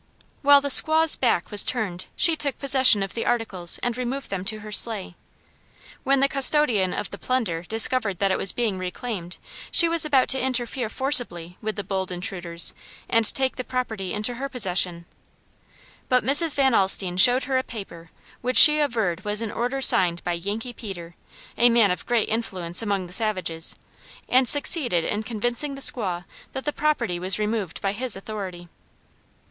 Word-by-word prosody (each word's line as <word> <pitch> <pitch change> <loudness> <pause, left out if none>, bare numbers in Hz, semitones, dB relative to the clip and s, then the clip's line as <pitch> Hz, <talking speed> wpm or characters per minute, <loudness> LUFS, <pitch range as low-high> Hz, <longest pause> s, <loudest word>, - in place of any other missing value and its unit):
While 285 0 +5
the 285 - -4
squaw's 315 +3 +4
back 230 -8 -1
was 205 -1 +4
turned 195 -7 -4
she 335 -3 +5
took 285 -3 0
possession 265 -7 +3
of 195 - -7
the 230 - -4
articles 205 -8 +1
and 240 -1 -2
removed 255 +1 -6
them 190 -2 -4
to 215 +1 -4
her 215 0 -10
sleigh. 210 -4 +2 0.9
When 275 0 +1
the 275 - +3
custodian 270 -8 +2
of 205 - -6
the 200 - -10
plunder 225 -11 -3
discovered 220 0 0
that 195 +1 0
it - - 0
was 195 - +3
being 220 -6 -3
reclaimed, 185 -1 -7 0.3
she 340 - +6
was 335 -1 -1
about 280 -4 +1
to 265 - +1
interfere 250 -2 -3
forcibly 230 - +2
with 215 -1 -5
the 205 - -6
bold 190 -1 -4
intruders 175 -1 -4 0.3
and 230 -1 +1
take 265 -1 -2
the 255 - -4
property 220 -7 -5
into 215 +3 -2
her 275 - -4
possession. 180 -7 -1 1.0
But 255 -1 +1
Mrs. 295 +3 +5
Van 270 -2 +1
Alstine 190 -3 +2
showed 245 +7 +5
her 265 -2 -2
a - - -4
paper 170 -9 -11 0.3
which 255 +1 -1
she 305 -1 +10
averred 225 - -2
was 210 0 -2
an 220 - -5
order 250 +3 -3
signed 175 -6 +3
by 175 - -3
"Yankee 205 +8 -5
Peter," 175 -7 -10 0.5
a 240 +1 +5
man 230 -5 +3
of 180 - -6
great 235 -3 0
influence 185 -6 -3
among 200 -4 -3
the 175 - -11
savages, 185 -6 -2 0.5
and 255 0 +2
succeeded 260 - +2
in 205 +5 -3
convincing 240 +6 -2
the - - -10
squaw 185 -10 -1 0.3
that 265 - -7
the 295 - -3
property 295 -13 -2
was 185 +2 +1
removed 210 -4 -4
by 195 - -1
his 240 +3 -1
authority. 195 -3 -8
220 Hz, 175 wpm, -22 LUFS, 185-260 Hz, 1.0 s, she